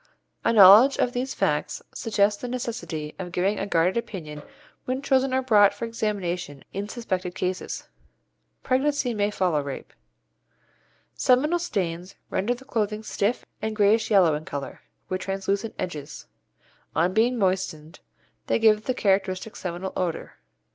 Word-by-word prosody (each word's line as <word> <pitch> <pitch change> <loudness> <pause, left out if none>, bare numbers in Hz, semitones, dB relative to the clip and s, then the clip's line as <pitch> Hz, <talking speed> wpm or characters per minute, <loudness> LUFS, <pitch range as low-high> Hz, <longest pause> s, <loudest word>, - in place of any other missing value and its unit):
A - - +3
knowledge 220 +5 +8
of 245 - +1
these 255 +2 -3
facts - - 0
suggests 205 -3 +1
the 250 - -4
necessity 225 -11 -4
of 180 -2 -5
giving 190 +4 0
a - - -2
guarded 175 +2 +2
opinion 175 -10 -5 0.4
when 255 +1 -1
children 270 -1 +2
are 260 0 +1
brought 205 -5 +5
for 220 - -4
examination 180 -9 -3
in 200 +2 -4
suspected 185 -6 -3
cases. 185 0 -3 0.8
Pregnancy 265 -1 +1
may 205 -1 +1
follow 180 -7 0
rape. 140 -1 -7 1.2
Seminal 295 +7 +2
stains 180 - -3 0.2
render 235 +6 0
the 260 +2 -15
clothing 215 -4 -2
stiff 215 +2 -1 0.2
and 220 0 -2
greyish 215 +2 +3
yellow 190 -7 +5
in 150 +1 -3
colour, 140 -3 -6 0.3
with 185 0 -3
translucent 195 +2 -2
edges. 150 -4 -6 0.7
On 175 +3 +2
being 240 +4 +2
moistened 185 -5 -2 0.5
they - - +2
give 220 -2 +3
the 255 - -1
characteristic 195 -1 0
seminal 180 +1 -5
odour. 175 -3 -3
205 Hz, 140 wpm, -25 LUFS, 180-235 Hz, 1.2 s, knowledge